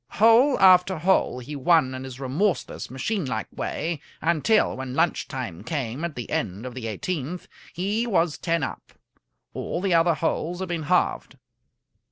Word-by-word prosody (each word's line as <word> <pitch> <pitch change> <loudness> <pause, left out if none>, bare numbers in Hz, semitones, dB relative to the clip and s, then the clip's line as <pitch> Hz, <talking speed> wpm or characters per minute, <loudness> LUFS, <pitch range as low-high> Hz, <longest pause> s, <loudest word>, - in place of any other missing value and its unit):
Hole 230 +6 +5
after 185 -1 +6
hole 175 -5 +2
he 130 +4 -7
won 140 -2 +3
in 130 0 -6
his 130 -1 -9
remorseless, 155 +9 -1
machine 180 - -2
like 130 - -2
way, 165 -1 -3 0.2
until 170 +7 +2
when 130 -1 -5
lunch 165 +3 +1
time 100 -9 -6
came 130 +1 -3
at 170 -4 -3
the 120 -3 -5
end 100 +5 -2
of 125 - -6
the 120 -2 -5
eighteenth 155 - -4 0.2
he 205 +7 -1
was 170 -7 +1
ten 170 -1 0
up. - - -6 0.6
All - - -3
the 190 -1 0
other 165 0 +4
holes 165 +2 -1
had 190 -1 -4
been 170 -2 -2
halved. 180 -5 +1
165 Hz, 165 wpm, -25 LUFS, 130-180 Hz, 0.6 s, after